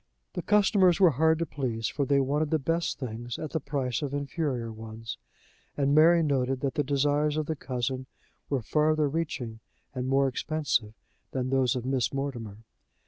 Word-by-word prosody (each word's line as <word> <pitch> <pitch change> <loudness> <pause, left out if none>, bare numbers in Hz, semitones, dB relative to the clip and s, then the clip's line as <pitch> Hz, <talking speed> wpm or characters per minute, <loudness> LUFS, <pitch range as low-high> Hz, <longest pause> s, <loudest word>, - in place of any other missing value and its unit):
The - - -3
customers 200 -4 +4
were 180 -4 +7
hard 160 +4 +3
to 170 - -1
please, 130 -6 -2
for 140 - -1
they 140 -1 +4
wanted 145 +3 +1
the 160 - +2
best 165 +4 -1
things 120 -1 -5
at 155 - -5
the 160 - 0
price 135 -4 -2
of 145 -1 -3
inferior 140 -5 -2
ones, 110 +1 -8 0.6
and 140 -1 +2
Mary 165 +2 +6
noted 135 -3 0
that 135 -2 -1
the 145 - +1
desires 145 +2 +1
of 155 - 0
the 160 - -2
cousin 130 -1 -3 0.4
were 135 -4 0
farther 155 +3 +2
reaching 135 -7 -3 0.3
and 130 -1 -3
more 135 +1 +3
expensive 130 -5 -1 0.4
than 130 -1 -1
those 135 -1 +2
of 125 -1 -3
Miss 130 -2 0
Mortimer. 120 -7 -4
140 Hz, 175 wpm, -28 LUFS, 125-155 Hz, 0.6 s, were